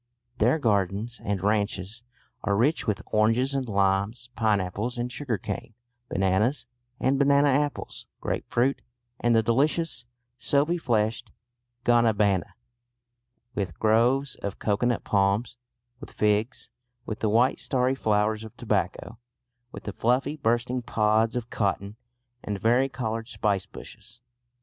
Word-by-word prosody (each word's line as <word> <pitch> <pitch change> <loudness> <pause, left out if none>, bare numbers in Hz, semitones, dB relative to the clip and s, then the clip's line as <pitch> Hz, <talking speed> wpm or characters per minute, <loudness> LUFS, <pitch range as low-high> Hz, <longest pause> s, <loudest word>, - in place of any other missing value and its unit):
There 120 +8 +4
gardens 105 - 0
and 100 -3 -2
ranches 105 +1 -1 0.4
are 100 -1 +1
rich 140 +7 +1
with 105 -3 -1
oranges 115 +5 +3
and 135 -3 -2
limes, 100 +4 0
pineapples 105 +1 0
and 120 +1 -2
sugar 125 -5 -2
cane, 115 +4 -6 0.3
bananas 95 +9 +1 0.3
and 135 +1 +2
banana 140 0 +4
apples, 145 +2 -1
grape - - -3
fruit 130 +4 +1 0.4
and 120 -1 +3
the 115 - +4
delicious 140 +3 +1 0.3
soapy 150 +8 +1
fleshed 115 -3 0 0.6
guanabana, 105 -6 +2 1.0
with 90 -5 -3
groves 120 +6 +3
of 100 - -5
cocoanut 115 +3 0
palms, 100 +4 +1 0.4
with - - -10
figs, 105 +3 0 0.3
with 110 - -5
the 110 - +1
white 120 +5 +3
starry 130 0 +1
flowers 110 -3 +1
of 110 - -11
tobacco, 115 - -2 0.5
with - - -9
the 105 - -5
fluffy 130 +7 +1
bursting 120 -1 0
pods 110 +1 +1
of 120 -1 -4
cotton, 100 0 -1 0.5
and 105 -1 -3
vari 125 +5 +3
coloured 115 -3 -3
spicebushes. 105 +2 -4
115 Hz, 125 wpm, -26 LUFS, 105-125 Hz, 1.0 s, There